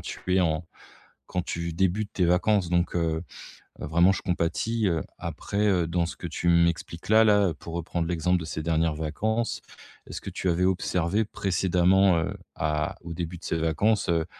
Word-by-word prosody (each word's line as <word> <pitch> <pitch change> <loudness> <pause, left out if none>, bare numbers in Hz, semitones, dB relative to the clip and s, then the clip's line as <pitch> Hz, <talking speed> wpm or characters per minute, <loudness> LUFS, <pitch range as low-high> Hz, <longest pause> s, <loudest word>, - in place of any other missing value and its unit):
tu 90 0 -3
es - - +4
en 80 -1 0 0.6
quand 90 - -2
tu 85 -1 -4
débutes 95 +4 0
tes 90 - +1
vacances 90 +1 +2
donc, 85 0 +1
heu 80 -1 -1 0.6
heu - - -3
vraiment, 85 +5 +4
je - - -4
compatis, 100 +5 0
heu, 80 -2 0 0.2
après, 100 +6 -2
heu, 90 -4 +2
dans 85 +1 0
ce 85 - -6
que 85 - -5
tu 85 +1 -1
m'expliques 85 0 +1
là 110 +1 +6
là, 105 -5 +4
pour 85 - -8
reprendre 85 0 -2
l'exemple 90 +1 +1
de 80 - -6
ces 80 0 -4
dernières 80 0 +1
vacances, 110 +10 -2 0.5
est-ce - - -6
que - - -6
tu 95 - -2
avais 85 +1 +1
observé 90 +2 +1
précédemment, 95 -2 +2
heu, 80 - -1 0.2
à 75 +1 -1
au 85 0 -6
début 85 +1 -5
de 85 - -19
ces 80 - -1
vacances, 90 +7 +1
heu, 85 -1 +2
85 Hz, 190 wpm, -26 LUFS, 80-95 Hz, 0.6 s, là